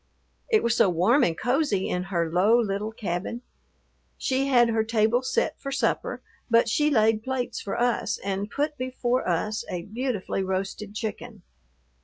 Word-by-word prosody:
It 440 -3 +3
was 235 -1 +2
so 200 - +4
warm 185 - +3
and 165 -1 +1
cozy 245 -7 +1
in 180 0 -2
her 170 -4 -1
low 205 +7 +4
little 210 -1 -1
cabin. 205 +3 -4 0.7
She 270 0 0
had 240 -3 +4
her 225 -1 +1
table 225 +2 +2
set 465 - -1
for 275 - -4
supper, 270 - -1 0.3
but 230 0 +4
she 295 +6 +2
laid 220 -5 +3
plates 260 +1 -3
for 195 - -4
us 240 -1 0
and 195 +1 -3
put 295 +4 -2
before 255 -2 -1
us 210 +5 -1
a 175 -1 -4
beautifully 220 -2 -3
roasted 195 +2 -3
chicken. 220 -2 -6
220 Hz, 160 wpm, -26 LUFS, 195-250 Hz, 0.7 s, so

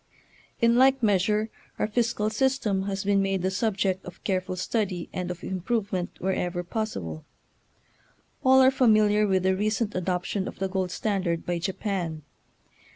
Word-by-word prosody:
In 235 0 +4
like 265 0 +4
measure 210 +2 +2 0.3
our - - +1
fis 230 +2 +1
cal 215 +1 -1
system 215 -5 0
has 195 -1 -2
been 200 0 +2
made 195 -2 0
the 190 - +1
subject 190 -2 0
of 180 - -11
careful 185 -1 -1
study 185 -2 -2
and 180 -1 -3
of 180 -1 -6
improvement 190 -1 -2
wher 190 +1 0
ever 175 -1 -2
possible. 170 - -4 1.2
All 265 0 +6
are 260 0 +6
familiar 215 -5 +4
with 190 -2 +2
the 190 0 +3
recent 215 +2 0
adoption 185 +2 -2
of - - -7
the 195 - -1
gold 190 -1 -1
standard 180 -3 -1
by 175 -1 -1
Japan. 175 -3 -3
195 Hz, 155 wpm, -26 LUFS, 185-215 Hz, 1.2 s, All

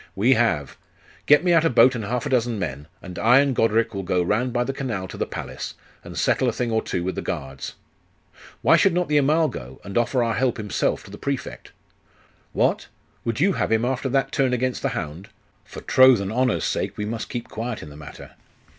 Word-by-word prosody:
'We 115 +7 +4
have. 110 - 0 0.5
Get 150 +2 +6
me 175 -1 +3
out 165 -1 +5
a 165 - +3
boat 125 +1 +5
and 115 -3 -4
half 120 +3 -2
a - - -2
dozen 120 -3 +1
men, 75 -6 -5 0.2
and 90 -2 -8
I 120 +3 +5
and 140 -2 +3
Goderic 115 0 +2
will 100 - -3
go 90 -1 0
round 115 +8 0
by 120 0 0
the 135 - -3
canal 115 -9 -4
to - - -9
the - - -2
palace, - - -6 0.3
and - - -9
settle 130 - +2
a - - 0
thing 120 +1 -2
or 110 0 +1
two 85 - -3
with 95 +1 -2
the - - -4
guards.' 65 0 -5 0.9
'Why - - +6
should 190 -3 +3
not 180 -2 0
the 150 -1 +4
Amal 155 +3 +3
go, 65 - -8
and 100 - -8
offer 120 +1 +1
our 115 -1 0
help 125 +1 0
himself 105 -3 -1
to - - -13
the 100 - -10
Prefect?' 140 -2 -5 0.8
'What? - - 0 0.4
Would 115 +1 -2
you 190 +5 +3
have - - -1
him 110 +1 +2
after 130 +1 -1
that 135 0 0
turn 130 -2 +1
against 125 0 -1
the - - 0
hound? 80 +6 -6 0.4
For - - -10
troth 130 -3 +6
and 100 0 -3
honour's 125 +1 +1
sake, - - -1
he 105 - -2
must 110 +1 -4
keep 120 -2 -5
quiet 115 +1 -5
in 75 - -10
the - - -12
matter. 75 -2 -11
120 Hz, 225 wpm, -23 LUFS, 100-130 Hz, 0.9 s, Get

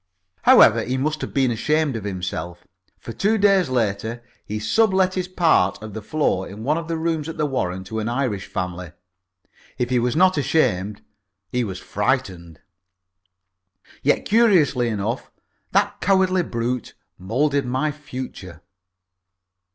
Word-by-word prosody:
However, - - +6
he 130 +2 -2
must 150 +3 -1
have - - -4
been 135 -3 +2
ashamed 150 +4 0
of 110 -3 -5
himself, 90 -2 -5 0.3
for 115 - -9
two 210 - +1
days 195 -6 +3
later 115 -1 -1 0.2
he 105 - -5
sub 190 - +2
let 185 -1 +3
his 185 -1 -2
part 165 - +2
of 110 -2 -8
the 110 - -6
floor 110 -6 -1
in 105 +3 -9
one 150 +5 +1
of 165 - -8
the 165 -1 -2
rooms 160 -1 -2
at 165 - -7
the 150 - +1
Warren 95 -10 -2
to 110 +4 -5
an 110 +1 -2
Irish 120 -6 -2
family. 90 -2 -5 0.8
If 125 0 -2
he 125 - +3
was 120 +2 0
not 185 -1 +4
ashamed, 105 - 0 0.5
he 125 0 0
was 95 -5 -5
frightened. 95 - -2 1.4
Yet, - - +1
curiously 185 - +3
enough, 110 +2 -3 0.4
that - - +1
cowardly 185 -1 +3
brute 120 - -3 0.2
moulded 135 +8 0
my 130 +5 0
future. 130 - -9
125 Hz, 150 wpm, -22 LUFS, 105-155 Hz, 1.4 s, However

